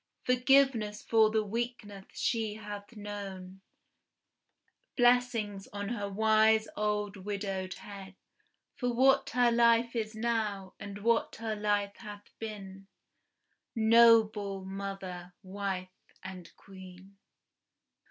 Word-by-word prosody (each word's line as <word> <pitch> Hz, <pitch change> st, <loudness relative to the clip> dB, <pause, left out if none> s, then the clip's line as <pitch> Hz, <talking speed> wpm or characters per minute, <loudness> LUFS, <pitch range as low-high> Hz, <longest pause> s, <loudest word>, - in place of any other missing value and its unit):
Forgiveness 250 Hz, -4 st, +3 dB
for 220 Hz, -1 st, +4 dB
the 215 Hz, 0 st, +1 dB
weakness 210 Hz, -2 st, -5 dB
she 220 Hz, -3 st, -1 dB
hath 205 Hz, +1 st, -9 dB
known! 195 Hz, -2 st, -7 dB, 1.4 s
Blessings 240 Hz, -5 st, +2 dB
on 205 Hz, 0 st, -5 dB
her 205 Hz, -4 st, -3 dB
wise 220 Hz, +1 st, +3 dB
old 210 Hz, -1 st, -1 dB
widowed 195 Hz, -1 st, -4 dB
head, 195 Hz, -2 st, -10 dB, 0.6 s
For 245 Hz, -1 st, -2 dB
what 270 Hz, +3 st, +3 dB
her 245 Hz, 0 st, +3 dB
life 235 Hz, 0 st, +3 dB
is 215 Hz, -1 st, -3 dB
now, 220 Hz, -4 st, -2 dB
and 200 Hz, 0 st, -8 dB
what 230 Hz, 0 st, +1 dB
her 225 Hz, -1 st, -3 dB
life 205 Hz, -1 st, -1 dB
hath 205 Hz, -2 st, -11 dB
been, 195 Hz, -3 st, -8 dB, 0.9 s
Noble 220 Hz, -3 st, +4 dB
mother, 190 Hz, -2 st, -6 dB
wife 190 Hz, -1 st, -4 dB, 0.3 s
and 185 Hz, -2 st, -9 dB
Queen! 190 Hz, 0 st, -14 dB
210 Hz, 105 wpm, -30 LUFS, 195-230 Hz, 1.4 s, for